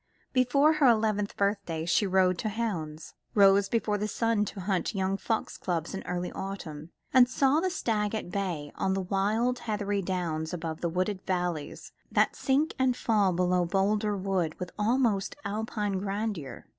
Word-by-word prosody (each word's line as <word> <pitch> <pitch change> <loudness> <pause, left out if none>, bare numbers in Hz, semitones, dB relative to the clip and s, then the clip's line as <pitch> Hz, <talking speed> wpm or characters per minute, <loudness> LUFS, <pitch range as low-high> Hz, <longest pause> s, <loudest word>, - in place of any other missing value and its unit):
Before 275 +4 +4
her 305 -3 +4
eleventh 215 -3 +2
birthday 200 -5 -1
she 175 +4 +2
rode 185 -1 +3
to 215 - -1
hounds, 170 -9 -4 0.2
rose 200 -1 +5
before 215 -3 0
the 210 - -1
sun 225 0 +1
to 200 -1 -7
hunt 190 +3 -1
the - - -5
young 190 0 +1
fox 220 +2 -2
cubs 170 -2 -2
in 195 - -4
early 180 0 -2
autumn, 170 -6 -6 0.2
and 250 -1 +7
saw 275 +3 +3
the 370 +3 0
stag 220 - -1
at 195 -5 -5
bay 175 -7 -3
on 190 0 0
the 195 - -1
wild 210 +6 0
heathery 205 -2 -1
downs 175 -3 -2
above 160 -2 -5
the 170 - 0
wooded 185 +3 -1
valleys 175 -5 -3 0.2
that - - +2
sink 285 +3 +1
and 260 -1 +2
fall 210 -4 +2
below 180 0 +2
Boldrewood 195 -2 0
with 180 -1 -5
almost 225 -3 +1
Alpine 210 -1 -2
grandeur. 195 - -4
200 Hz, 165 wpm, -28 LUFS, 180-220 Hz, 0.2 s, and